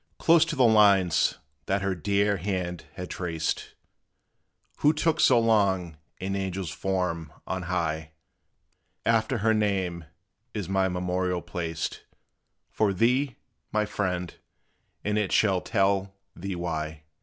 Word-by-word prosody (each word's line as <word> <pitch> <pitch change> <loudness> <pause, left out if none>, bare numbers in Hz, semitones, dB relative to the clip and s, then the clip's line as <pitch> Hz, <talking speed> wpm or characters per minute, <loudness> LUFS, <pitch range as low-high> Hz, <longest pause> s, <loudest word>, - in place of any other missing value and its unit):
Close 165 -1 +5
to 165 - -3
the 130 - +4
lines 100 -7 +4 0.3
that 100 +1 0
her 95 -1 +1
dear 100 +3 +1
hand 90 -2 -3
had 90 - -5
traced, 80 -3 -3 1.0
Who 150 +1 +4
took 160 +1 +1
so 125 -2 +6
soon 95 -7 +2 0.2
an 95 +1 -2
angel's 95 -3 -3
form 90 -5 -2
on 95 0 -3
high 80 -3 -2 0.9
After 115 +2 +2
her 110 +1 +2
name 95 -6 0 0.5
is 100 -5 -3
my 95 0 +1
memorial 90 0 -1
placed 80 -2 -4 0.7
For 105 -2 +1
thee, 125 +6 +2 0.4
my 105 0 +1
friend, 90 -4 -2 0.7
and 105 +1 +1
it 100 -3 -1
shall 95 -4 +3
tell 100 -2 +1 0.2
thee 95 +2 -4
why. 80 -3 -4
95 Hz, 125 wpm, -27 LUFS, 90-105 Hz, 1.0 s, so